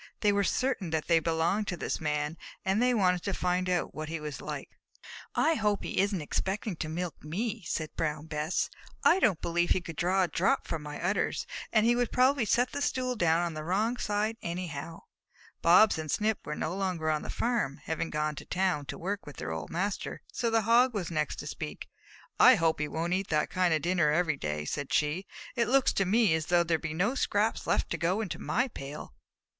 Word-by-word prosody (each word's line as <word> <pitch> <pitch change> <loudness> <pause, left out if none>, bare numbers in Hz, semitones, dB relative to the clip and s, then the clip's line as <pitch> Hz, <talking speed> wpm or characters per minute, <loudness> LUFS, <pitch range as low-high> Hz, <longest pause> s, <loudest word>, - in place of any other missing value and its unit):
They 210 - +4
were 200 0 +2
certain 255 -4 0
that 160 -1 -1
they 165 -1 +4
belonged 165 +6 0
to 175 - -2
this - - -3
Man, 150 0 -1 0.3
and 195 +4 +2
they 250 0 +4
wanted 180 -4 +3
to 200 0 -2
find 180 0 0
out 180 -1 0
what 155 0 -5
he 165 0 -3
was 150 -2 -6
like. - - -5 0.7
"I 325 - +3
hope 210 -7 0
he - - -2
isn't 195 -4 +1
expecting 195 +5 -2
to 155 - -3
milk 170 +1 -4
me," 200 +9 -3
said 155 -1 -3
Brown 150 -1 -2
Bess. 155 +2 -1 0.3
"I 360 - +6
don't 205 - +3
believe 175 +1 +1
he - - +3
could 165 -2 -8
draw 185 +2 +2
a - - +1
drop 195 +11 +1
from 165 - -3
my 150 0 -7
udders, 180 +4 0 0.3
and 220 -1 +4
he 240 +1 +4
would 245 -1 0
probably 255 0 +3
set 245 +4 +2
the 285 - -4
stool 255 -3 0
down 170 -5 +3
on 170 -1 -2
the 155 0 -5
wrong 210 +8 +1
side 215 0 -1
anyhow." 170 -3 -5 0.6
Bobs 180 +2 +6
and 155 -1 -5
Snip 215 +6 +1
were - - -2
no 160 +4 -2
longer 180 -5 -1
on 155 -1 0
the - - -7
farm, 230 - -1
having 160 +1 -2
gone 150 0 -1
to - - -7
town, 180 -6 0
to - - -5
work 200 +3 -2
there - - -25
with 145 - -12
their - - -4
old 80 -1 -5
master, 195 +4 -3
so 235 - 0
the 225 -1 +2
Hog 235 +3 +4
was 185 -5 -2
the - - -7
next 150 -2 0
to - - -7
speak. - - -6 0.5
"I - - +9
hope 160 -1 +1
he 150 - 0
won't 165 +3 -2
eat 190 +1 0
that 150 -1 0
kind 185 -2 +2
of 155 -2 +1
dinner 175 -3 +2
every 155 0 +2
day," 75 - -3
said 145 - -4
she. 155 +6 +1 0.3
"It 235 -2 +1
looks 270 +1 +3
to 195 - +1
me 210 -1 +4
as 160 -1 -1
though 175 -1 +4
there 165 -1 +1
would - - -20
be 155 -1 -4
no 200 +9 +1
scraps 220 -4 0
left - - +1
to - - -2
go 180 +5 +1
into 200 -6 -4
my 245 +4 0
pail." 145 - -8
180 Hz, 225 wpm, -29 LUFS, 160-210 Hz, 0.7 s, I